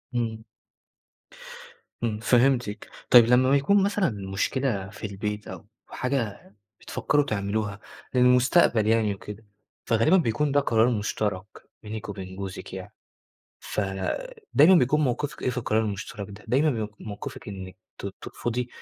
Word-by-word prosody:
إمم. 110 -2 -2 1.6
إمم، 110 -2 -1
فهمتِك. 120 -2 +2 0.2
طيب 120 -2 +9
لمّا 125 +2 +4
بيكون 145 +9 +4
مثلًا 200 -1 +1 0.2
مشكلة 100 0 -1
في 110 - -6
البيت 105 +1 -4
أو 95 -1 -9 0.2
حاجة 125 -7 -3 0.3
بتفكّروا 145 -1 0
تعملوها 105 -2 -2 0.3
للمستقبل 125 -2 +4
يعني 110 -2 +3
وكده، 105 +2 -10 0.4
فغالبًا 115 +11 +4
بيكون 150 0 +1
ده 145 - +4
قرار 115 -4 +3
مُشترَك 105 -4 -2 0.4
بينِك 110 0 -6
وبين 95 -2 -7
جوزِك 95 -1 -7
يعني، 95 +3 -8 0.7
فدايمًا 160 - +1
بيكون 150 -1 +3
موقِفِك 145 +1 -1
إيه - - +1
في 125 - -3
القرار 110 -2 +1
المُشترَك 100 -1 -5
ده؟ 100 +1 -12
دايمًا 140 +6 +3
بيك 110 -5 -3
موقِفِك 105 0 -7
إنِّك 95 -2 -8 0.2
ت - - -5
ترفُضي 120 +1 -3
110 Hz, 130 wpm, -26 LUFS, 105-130 Hz, 1.6 s, طيب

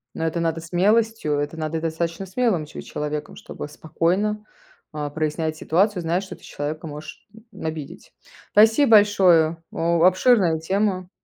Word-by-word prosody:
Ну, - - -4
это 165 +1 -1
надо 165 -1 -1
смелостью, 200 0 +1
это 145 +2 -3
надо 160 0 -3
достаточно 165 +3 -3
смелым 190 -4 0
че 150 - -9
человеком, 150 0 -5
чтобы - - -8
спокойно, 180 +8 -1 0.5
а, 150 -1 -4
прояснять 155 +1 -2
ситуацию, 185 +5 +1
зная, 170 +2 0
что 195 - -9
ты - - -23
человека 155 +2 -5
можешь, 150 +1 -10 0.2
м, - - -9
обидеть. 155 -3 -7 0.4
Спасибо 225 +5 +5
большое! 180 -6 +5
О 170 0 +1
обширная 185 -2 +4
тема. 185 +1 -1
165 Hz, 145 wpm, -23 LUFS, 155-195 Hz, 0.5 s, Спасибо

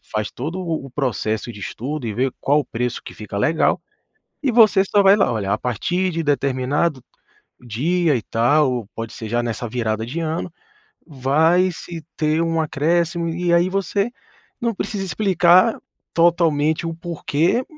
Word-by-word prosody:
faz 105 -1 -2
todo 155 +9 -5
o 160 -6 -3
o - - -12
processo 120 -4 -2
de 105 - -11
estudo 135 +6 -5
e 110 - -3
vê 130 +4 +1
qual 145 +2 +3
o - - -5
preço 125 0 -3
que - - -10
fica 105 -2 -7
legal 155 +10 +2 0.6
e 275 - +1
você 215 -4 +6
só 205 +1 +3
vai 195 +1 +7
lá: 200 - +2
"Olha, 100 -4 -2
a 105 - +2
partir 175 - -1
de 165 0 -2
determinado 140 0 0 0.6
dia 150 +8 +1
e 120 - -1
tal", 130 +6 +2
ou 120 -5 -3
pode 115 -1 -5
ser 110 - -7
já 120 +2 0
nessa 120 0 -3
virada 110 -1 -2
de 135 +8 -4
ano, 165 +2 -3 0.6
"vai 160 +6 +2
se 165 -1 -8
ter 155 0 +1
um 165 -1 0
acréscimo". 170 +3 0
E 175 +1 -1
aí 170 +1 +4
você 195 +3 -1 0.5
não 235 -1 0
precisa 200 0 -3
explicar 185 +1 +3 0.3
totalmente 165 -2 +2
o 165 - -3
porquê, 170 - 0
155 Hz, 170 wpm, -21 LUFS, 125-175 Hz, 0.6 s, vai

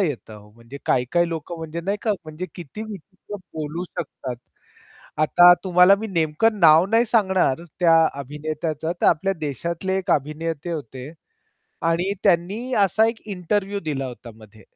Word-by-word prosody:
येतं 145 - -3
हो 105 0 -16
म्हणजे 115 +5 -12
काही-काही 165 +8 +1
लोकं 165 +1 -5
म्हणजे 165 +1 -5
नाही 195 +4 -2
का, 220 - +1
म्हणजे 155 +3 -6
किती 175 +5 -8
विचित्र 205 -1 -9 0.2
बोलू 155 +3 -4
शकतात. 130 -5 -5 0.9
आता 175 +3 +7
तुम्हाला 180 +1 +6
मी 220 - -3
नेमकं 175 +5 +1
नाव 160 +2 +7
नाही 225 +1 +4
सांगणार 190 - +2 0.2
त्या 170 -2 +5 0.3
अभिनेत्याचं 155 +3 -4
तर - - +3
आपल्या 195 +5 +2
देशातले 170 +6 -3
एक 190 - -4
अभिनेते 155 +3 -2
होते. 135 -1 -7 0.7
आणि 170 +4 +1
त्यांनी 200 +7 +1
असा 215 +4 +3
एक 230 -1 -4
इंटरव्ह्यू 200 +1 -2
दिला 145 -5 -3
होता 125 -1 -10
मध्ये 110 0 -17
165 Hz, 145 wpm, -22 LUFS, 150-190 Hz, 0.9 s, आता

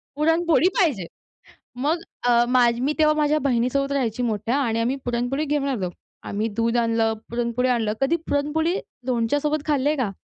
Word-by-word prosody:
पुरणपोळी 325 +2 +3
पाहिजे. 265 - +1 0.7
मग 300 +7 0 0.3
अ, 240 0 +5
माझी 240 -1 +3
मी 275 +4 +1
तेव्हा 305 -1 +4
माझ्या 300 0 +2
बहिणीसोबत 275 +1 0
राहायची 250 -4 -1
मोठ्या 225 +1 -1
आणि 230 -5 0
आम्ही 245 +4 0
पुरणपोळी 245 +4 -1
घेऊन 290 -1 -1
आलो. 200 -10 -2 0.3
आम्ही 210 +2 -2
दूध 230 +1 +1
आणलं 230 -1 +2 0.2
पुरणपोळी 240 +1 -1
आणलं 230 -4 +1
कधी 270 +5 +2
पुरणपोळी 310 +4 0 0.3
लोणच्यासोबत 290 +5 0
खाल्ली 290 -2 +1
आहे 305 - +1
का? 250 -7 -1
255 Hz, 160 wpm, -23 LUFS, 235-295 Hz, 0.7 s, अ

